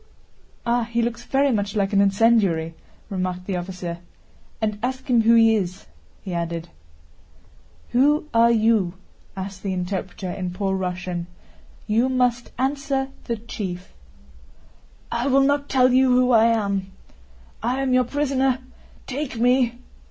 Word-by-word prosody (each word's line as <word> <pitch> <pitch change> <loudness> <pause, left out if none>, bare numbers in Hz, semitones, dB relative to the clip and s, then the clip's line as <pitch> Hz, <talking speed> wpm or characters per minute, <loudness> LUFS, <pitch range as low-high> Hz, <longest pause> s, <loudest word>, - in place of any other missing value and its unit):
"Ah, 235 0 +1
he 235 +1 -2
looks 235 0 -2
very 275 +1 +2
much 205 -2 -1
like 200 -1 0
an 200 - +5
incendiary," 195 -5 +3 0.4
remarked 185 -1 -3
the 195 - -2
officer. 180 -1 -5 0.6
"And 210 -2 -2
ask 260 +2 -3
him 240 -3 +4
who 230 +1 +5
he 225 -1 +6
is," 185 -2 -3 0.4
he 190 - -5
added. 170 -1 -3 1.2
"Who 290 +5 +3
are 230 0 +5
you?" 220 -5 +2 0.4
asked 190 0 -6
the 195 -2 -2
interpreter 185 0 -4
in 180 -1 -4
poor 195 +1 -1
Russian. 180 -2 -3 0.6
"You 230 +4 +2
must 250 -2 +1
answer 270 +1 -1 0.2
the 235 - -2
chief." 190 -5 -6 1.2
"I 235 +3 -1
will 275 0 +4
not 285 +1 +1
tell 255 -1 +4
you 260 0 +5
who 250 0 +4
I 225 -1 +6
am. 200 -4 0 0.7
I 245 +4 -1
am 270 -1 0
your 255 0 +4
prisoner—take 265 0 -3
me!" 245 0 +2
230 Hz, 135 wpm, -23 LUFS, 190-255 Hz, 1.2 s, he